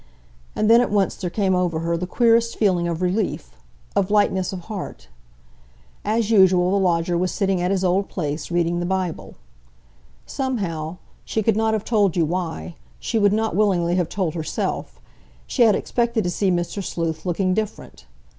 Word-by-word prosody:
And 215 - +1
then 230 +2 +7
at 245 - 0
once 200 -2 +1
there 180 - -4
came 190 0 0
over 175 -3 0
her 170 0 0
the 180 +2 -3
queerest 230 +1 +2
feeling 180 -5 +2
of 170 +1 -2
relief, 185 +3 -1 0.4
of 190 - +1
lightness 205 -3 +2
of 185 -2 -6
heart. 190 - -7 0.9
As 225 0 0
usual, 185 -3 +5
the 200 - +2
lodger 175 -2 +1
was 180 +1 0
sitting 195 -3 0
at 180 - 0
his 190 -1 0
old 190 +2 +1
place, 150 -3 -4
reading 175 0 0
the 175 - -2
Bible. 185 -3 -3 0.9
Somehow—she 195 - -4
could 225 0 +2
not 220 0 +1
have 215 - -4
told 205 -6 +2
you 165 - +3
why, 175 +1 -3 0.3
she 225 - -1
would 205 -1 +4
not 220 -2 0
willingly 185 -4 +2
have 180 -2 0
told 185 -6 -2
herself—she 60 - -5
had 225 -3 +6
expected 235 -2 0
to 175 - -1
see 195 +2 0
Mr. 175 +3 -1
Sleuth 160 -3 -3
looking 185 +1 0
different. 205 - -5
185 Hz, 170 wpm, -22 LUFS, 170-210 Hz, 0.9 s, then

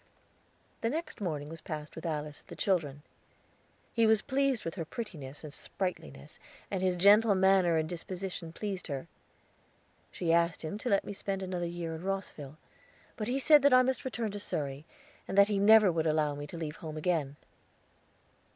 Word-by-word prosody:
The 230 - +1
next 310 -2 -4
morning 150 -6 -3
was 165 +1 -9
passed 150 -1 -6
with 165 +1 -5
Alice 150 -2 -3
and - - -31
the - - -9
children. 150 -7 0 0.9
He 230 -1 +4
was 220 -1 +4
pleased 275 -3 0
with 165 - -3
her 170 - -4
prettiness 155 - -7
and 150 -2 -8
sprightliness, 75 - -5 0.3
and 190 -2 -1
his 185 -1 +2
gentle 205 +3 +6
manner 190 -3 +4
and 155 0 0
disposition 180 0 -6
pleased 195 +1 -5
her. 140 -4 -4 1.1
She 165 -2 0
asked 170 0 +2
him 180 +7 -4
to 250 - -3
let 200 - +2
me - - -5
spend 195 -1 -3
another 180 -2 -2
year 170 -1 -4
in 160 - -6
Rosville; 180 -7 -4 0.6
but 215 - -4
he 250 +2 0
said 295 +2 +6
that 280 -2 +6
I 255 - +7
must 260 +1 -1
return 235 -4 -3
to 205 - -5
Surrey, 145 -6 -3 0.4
and 195 - -4
that 200 +1 +7
he 205 -2 +1
never 210 -1 +7
would 165 -1 0
allow 155 -1 +2
me 145 0 -6
to 170 - -8
leave 160 -1 -5
home 155 -1 -7
again. 155 -4 0
180 Hz, 185 wpm, -31 LUFS, 155-205 Hz, 1.1 s, I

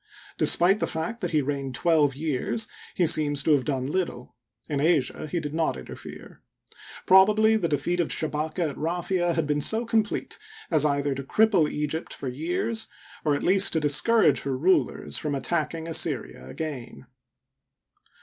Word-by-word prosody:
Despite 190 +4 +3
the - - -1
fact 165 +9 -4
that 180 - -2
he 155 -3 +1
reigned 135 -2 -3
twelve 150 0 +2
years, 155 - -2 0.3
he 180 - +2
seems 145 -3 +2
to 160 - +2
have 140 -4 +3
done 135 -4 -2
little. 145 -5 -3 0.3
In 145 -2 -2
Asia 155 -2 0
he 175 +3 -2
did 150 -2 -6
not 160 - 0
interifere. 65 - -11 0.6
Probably 215 +4 +5
the 210 -6 0
defeat 155 +5 -1
of 170 - +1
Shabaka 155 +2 -2
at - - -12
Raphia 175 +1 -1
had 165 -2 0
been 150 0 -1
so 220 +9 +1
complete 220 -2 -1 0.3
as 155 -2 +4
either 140 -1 0
to 135 +1 -6
cripple 195 0 +3
Egypt 150 +2 -3
for 135 - -5
years, 175 - -2 0.4
or 150 -2 +2
at - - -4
least 190 +1 +4
to 160 - +2
discourage 150 - +3
her 135 -2 -3
rulers 180 +7 0
from 150 -3 -2
attacking 165 +3 -2
Assyria 110 - -1
again. 130 - -7
155 Hz, 160 wpm, -25 LUFS, 145-180 Hz, 0.6 s, Probably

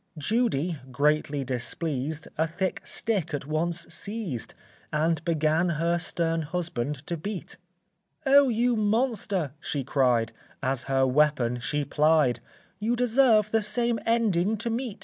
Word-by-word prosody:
Judy, 175 - 0
greatly 145 +1 +1
displeased, 135 +4 -3
A 160 +1 +1
thick 185 +3 -2
stick 185 -9 -1
at 140 - -5
once 165 +3 -1
seized, 200 - -4 0.4
And 155 +1 +1
began 160 +1 +1
her 170 +2 +1
stern 165 -1 -1
husband 150 -4 -3
to 170 - -2
beat; 185 +2 -6 0.7
"O 275 0 +6
you 240 +1 +2
monster," 210 - 0
she 145 -4 -3
cried, 125 -4 +2 0.3
As 130 -1 0
her 135 -1 +2
weapon 130 -3 +2
she 145 +4 -2
plied, 150 -6 +3 0.4
"You 225 +3 0
deserve 235 -3 +4
the 225 - +3
same 235 +2 +1
ending 220 -3 +2
to 230 +2 -2
meet." 235 -2 -3
165 Hz, 130 wpm, -27 LUFS, 145-215 Hz, 0.7 s, O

